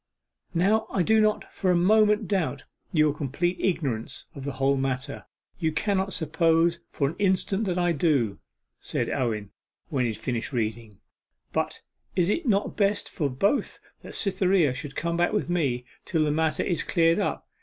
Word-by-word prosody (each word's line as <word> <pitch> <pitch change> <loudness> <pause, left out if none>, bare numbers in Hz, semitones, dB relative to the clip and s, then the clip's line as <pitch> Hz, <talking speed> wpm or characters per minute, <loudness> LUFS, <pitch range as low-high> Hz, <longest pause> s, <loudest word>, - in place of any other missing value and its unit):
'Now 200 +6 +2
I 185 - +1
do 220 +3 +4
not 215 0 +1
for 185 - -1
a 180 - +4
moment 210 +3 +4
doubt 165 -8 -1 0.3
your 155 -3 +3
complete 165 +6 -1
ignorance 135 -10 -2
of 135 -1 -8
the 140 - -3
whole 135 +1 +2
matter; 130 -1 -3 0.3
you 160 -1 +1
cannot 195 +3 0
suppose 165 +1 +2
for 140 - 0
an 155 - -4
instant 195 +1 +1
that 180 -2 -1
I 175 -1 +2
do,' 140 - +1 0.4
said - - -2
Owen 110 -5 -2 0.4
when 135 -6 0
he 115 - 0
had - - -8
finished 120 +1 -3
reading. 110 -3 -3 0.6
'But - - -1 0.3
is 180 0 +2
it 325 +5 -1
not 200 -2 +1
best 205 -1 +1
for 145 -5 -1
both 195 - 0 0.2
that - - -9
Cytherea 185 - +2
should 135 +2 -7
come 170 0 -1
back 175 0 +2
with 205 -4 0
me 135 -8 0 0.2
till 160 -3 +1
the 150 - +1
matter 160 +1 +1
is 175 -4 0
cleared 165 +2 +3
up? 200 - -2
165 Hz, 175 wpm, -26 LUFS, 135-190 Hz, 0.6 s, do